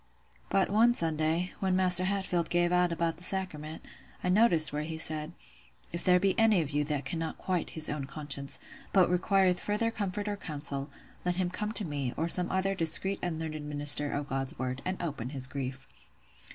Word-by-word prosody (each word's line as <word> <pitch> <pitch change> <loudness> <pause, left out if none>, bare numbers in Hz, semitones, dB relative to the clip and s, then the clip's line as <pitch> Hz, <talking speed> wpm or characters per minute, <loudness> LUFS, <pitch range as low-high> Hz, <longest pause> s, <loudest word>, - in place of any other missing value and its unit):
"But 195 - +1
one 235 +3 +4
Sunday, 160 +1 0
when 190 -1 0
Maister 185 -1 +6
Hatfield 190 -3 -1
gave 175 0 +1
out 180 -1 +2
about 170 0 -2
the 175 - -11
sacrament, 160 -5 -4 0.4
I 180 - -1
noticed 180 -7 +4
where 150 - -2
he 160 +1 -5
said, 155 0 +1 0.6
'If 170 - -3
there 180 0 +4
be 195 0 +1
any 220 -4 +4
of 150 -2 -5
you 145 0 0
that 145 -2 -3
cannot 165 -1 -4
quiet 180 -2 -3
his 155 - +2
own 145 -2 -4
conscience, 140 -1 -3 0.3
but 185 -3 +4
requireth 185 0 +1
further 210 +2 -1
comfort 205 -1 -4
or 205 -1 -3
counsel, 145 -5 -3 0.3
let 180 0 -1
him 180 -1 -2
come 210 +3 -4
to 215 - 0
me, 140 -5 -4
or 160 - -1
some 180 +1 +3
other 190 +1 0
discreet 190 +3 +5
and 175 -3 -3
learned 155 -2 -6
minister 145 0 +4
of 145 0 -4
God's 135 -1 -3
word, 130 +1 -4
and 185 0 -3
open 145 -8 -5
his 135 -2 +1
grief! 135 0 -6
170 Hz, 190 wpm, -29 LUFS, 150-185 Hz, 0.6 s, Maister